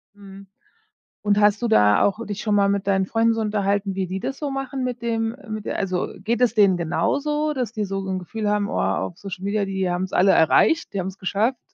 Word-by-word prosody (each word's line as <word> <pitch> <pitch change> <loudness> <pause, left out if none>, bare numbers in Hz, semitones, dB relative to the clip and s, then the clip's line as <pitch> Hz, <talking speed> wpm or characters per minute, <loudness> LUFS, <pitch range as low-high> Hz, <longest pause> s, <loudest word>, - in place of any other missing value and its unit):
Mhm. 195 -1 -13 0.7
Und 205 -1 +1
hast 210 +1 +3
du 240 - 0
da 105 - +4
auch 215 +3 0
dich 205 0 -5
schon 210 -2 0
mal 200 -1 +3
mit 200 0 -1
deinen 190 -1 +2
Freunden 225 +3 +2
so 225 - -2
unterhalten, 200 -2 0
wie 190 -1 -2
die 190 +2 -4
das 270 - -4
so 295 - -3
machen 270 0 -4
mit 245 -1 -4
dem 225 -1 -1
mit 215 -1 -5
d - - -3
also, 185 -3 -1 0.2
geht 230 +3 0
es 245 - +3
denen 200 -4 +4
genauso, 295 - 0
dass 250 -5 -3
die 215 - -2
so 195 -1 -3
'n 190 -1 -2
Gefühl 210 +4 -4
haben: 205 0 0
„Oh, - - -2
auf 175 - -1
Social 190 -1 -8
Media, 200 0 0
die 190 -1 -2
haben 175 +1 -1
es 190 - -13
alle 190 +2 +5
erreicht, 320 - +3
die 200 - -2
haben 185 - -2
es 190 0 -7
geschafft. 215 +7 0
205 Hz, 240 wpm, -23 LUFS, 190-225 Hz, 0.7 s, alle